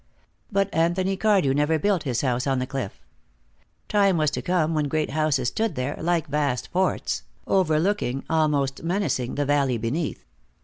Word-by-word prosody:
But 200 -1 0
Anthony 175 +4 +1
Cardew 195 -9 +3
never 150 +3 +2
built 190 +2 +1
his 130 -6 -1
house 125 -1 0
on 135 -1 +1
the 125 - -1
cliff. 135 -6 -5 0.9
Time 200 -3 +3
was 155 -2 +2
to - - -3
come 170 -3 +1
when 150 -2 0
great 155 0 -1
houses 155 -4 +1
stood 225 -1 -1
there, 130 +3 -2
like 170 -1 +1
vast 140 -4 -1
forts, 185 +1 0 0.2
overlooking, 165 -5 +1
almost 150 -4 +1
menacing, 165 -8 -1
the 145 - 0
valley 140 -3 +2
beneath. 130 +9 -3
155 Hz, 160 wpm, -24 LUFS, 135-180 Hz, 0.9 s, Cardew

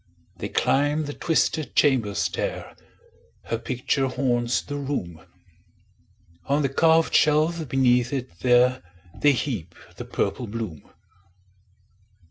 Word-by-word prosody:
They - - -5
climb 145 +3 +1
the 145 - -5
twisted 160 -2 0
chamber 120 -9 +2
stair; 100 - -3 0.7
Her 115 - -3
picture 130 +3 -1
haunts 120 -2 0
the 145 - -5
room; 90 - -4 1.2
On 145 +2 +1
the 135 - +1
carved 160 +3 +3
shelf 155 0 +2
beneath 125 -1 +2
it 130 -10 -5
there, 125 +1 +3 0.4
They 145 -1 +5
heap 110 - -4 0.2
the - - -6
purple 120 - -2
bloom. 105 -7 -6
130 Hz, 110 wpm, -24 LUFS, 120-145 Hz, 1.2 s, They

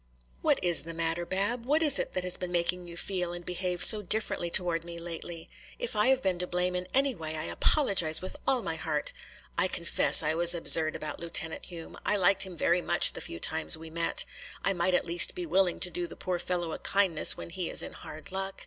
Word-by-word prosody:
"What - - +2
is 175 -2 +3
the 165 +1 -6
matter, 165 +1 0
Bab? 205 +6 +1
What 300 +6 +1
is 295 -4 +2
it - - -3
that 185 - -2
has 180 0 0
been 180 -1 -6
making 175 +1 -1
you 170 0 -9
feel 180 -2 0
and 175 0 -8
behave 180 0 -1
so 215 -2 +7
differently 205 -3 +1
toward 170 -2 +1
me 170 0 -8
lately? 170 0 -7 0.3
If 485 - -4
I 210 +2 +2
have 265 0 +2
been 185 -2 0
to 180 - -2
blame 180 +1 -1
in 180 0 -3
any 275 0 +1
way 160 -5 -6
I 155 - -2
apologize 180 - +2
with 185 - -7
all 260 -2 +2
my - - -3
heart. - - -3 0.5
I 195 - +4
confess 165 -4 +2
I 155 +1 +1
was 170 +1 +3
absurd 160 -1 +3
about 155 - -5
Lieutenant 165 -1 -1
Hume. 170 -2 -9
I 210 - +2
liked 190 0 +4
him 185 -3 -2
very 175 +3 +1
much - - +2
the - - -6
few 85 - -7
times 160 - +2
we 160 0 -11
met. 165 +1 +1 0.4
I 195 - +3
might 180 0 +1
at - - 0
least 170 0 +2
be 360 - -4
willing 190 - +1
to 180 - +4
do 175 +1 -3
the - - -8
poor 180 -1 -3
fellow 175 -1 -3
a - - -6
kindness 195 -5 +3
when - - -9
he 180 -1 -4
is - - +2
in - - -8
hard 155 +6 -11
luck. 195 0 -4
175 Hz, 235 wpm, -28 LUFS, 170-195 Hz, 0.5 s, so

